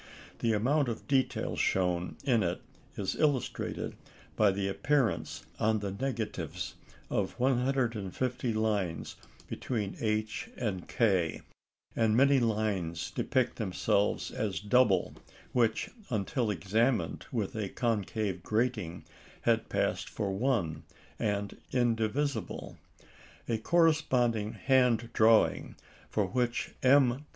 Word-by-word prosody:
The 115 -1 +2
amount 135 +6 +2
of 115 - -6
detail 135 -2 +1
shown 90 -1 0
in 125 -5 +3
it 90 -2 -2 0.3
is - - -1
illustrated 145 -5 -1 0.4
by 105 -2 +5
the 95 0 -1
appearance 135 +4 0
on 110 +1 +2
the 100 -2 -3
negatives 115 0 -3 0.4
of - - -1
150 125 -2 0
lines 105 -6 -1 0.3
between 105 -6 -3
H 110 0 -1
and 100 -7 -3
K; 95 -9 +1 0.5
and 110 -1 +3
many 135 +1 +5
lines 105 -8 -1
depict 130 -2 0
themselves 100 -1 0
as 105 -3 -2
double 105 -3 +3 0.4
which, 115 -3 +1 0.2
until 115 +1 -1
examined 110 +6 0
with 110 -6 -2
a 105 -3 -2
concave 105 -4 -1
grating, 105 -5 -1 0.4
had - - +1
passed - - 0
for 100 -2 -2
one 95 - 0 0.4
and 105 -2 -1
indivisible. 120 +3 -1 0.7
A 115 -2 0
corresponding 125 -8 +2
hand 125 -4 +2
drawing, 110 0 +4 0.3
for - - +1
which 120 -1 -1
M. 135 +1 +4
110 Hz, 105 wpm, -30 LUFS, 100-125 Hz, 0.7 s, by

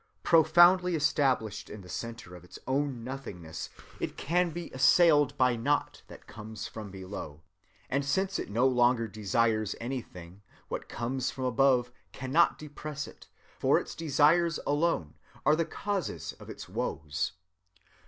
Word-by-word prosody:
Profoundly 175 +2 +6
established 135 -8 +1
in 105 - -8
the 90 - -13
centre 115 -3 -6
of 90 - -12
its 90 - -12
own 135 -2 -1
nothingness, 95 -11 -7 0.3
it - - -4
can 175 +4 +1
be 170 +1 -7
assailed 145 +1 +5
by 125 -1 +3
naught 145 +6 -1
that - - -13
comes 110 0 -8
from 110 -2 -7
below; 95 -6 -8 0.4
and 140 +2 0
since 190 +7 0
it - - -5
no 115 +5 +2
longer 120 -2 +3
desires 110 0 0
anything, 100 -7 -7 0.3
what - - -5
comes 130 +2 -2
from 130 - -6
above 125 -1 +3 0.2
cannot 135 +7 +2
depress 150 -1 -6
it; - - -14 0.3
for - - +4
its - - -7
desires 160 +2 +3
alone 145 - 0 0.3
are 150 +2 +5
the 165 +1 0
causes 165 - -3
of - - -12
its - - -8
woes." 75 +3 -3
130 Hz, 145 wpm, -29 LUFS, 110-150 Hz, 0.4 s, Profoundly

